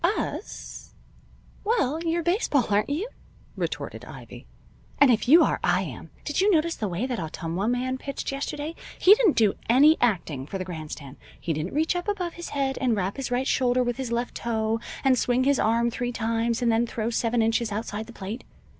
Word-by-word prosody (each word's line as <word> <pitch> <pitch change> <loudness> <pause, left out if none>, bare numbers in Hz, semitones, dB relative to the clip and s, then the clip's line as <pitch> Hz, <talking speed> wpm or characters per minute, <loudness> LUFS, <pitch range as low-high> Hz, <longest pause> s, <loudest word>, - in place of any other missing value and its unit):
"Us? 375 +5 -3 0.7
Well, 390 - +1
you're 335 0 0
baseball, 345 - +2
aren't 205 +5 +2
you?" 320 +10 -1 0.5
retorted - - -4
Ivy. - - -11 0.5
"And 280 -3 +6
if 220 0 +1
you 325 +6 +8
are, - - +1
I - - +3
am. - - -8 0.2
Did 295 +4 0
you 400 - +4
notice 335 -3 +3
the 215 - -3
way 185 +6 -2
that 250 -3 -3
Ottumwa 165 +4 -3
man 255 +2 -1
pitched 275 0 -4
yesterday? 290 +3 -4 0.2
He 385 - +8
didn't 430 -7 +3
do 215 -4 +4 0.2
any 290 +7 +6
acting 165 - 0
for 195 - -4
the 185 - -4
grandstand. 155 -5 -7 0.2
He 165 - -2
didn't 155 - -4
reach 320 +3 +1
up 355 +2 -3
above 365 -5 -2
his 345 - -7
head, 270 -2 -1
and 250 -4 +2
wrap 195 -1 -2
his 270 - -3
right 250 +2 0
shoulder 250 -1 +2
with 245 -1 -2
his 260 -3 -4
left 240 +1 -1
toe, 225 -1 -1 0.2
and 260 -3 +4
swing 250 +1 +2
his 280 0 +3
arm 235 +2 +2
three 245 +1 -2
times 230 +1 -1
and 235 - +3
then 230 +1 +2
throw 230 0 -2
seven 230 0 +1
inches 225 0 +1
outside 215 0 -4
the 235 - -11
plate. 210 +4 -6
245 Hz, 200 wpm, -26 LUFS, 220-285 Hz, 0.7 s, you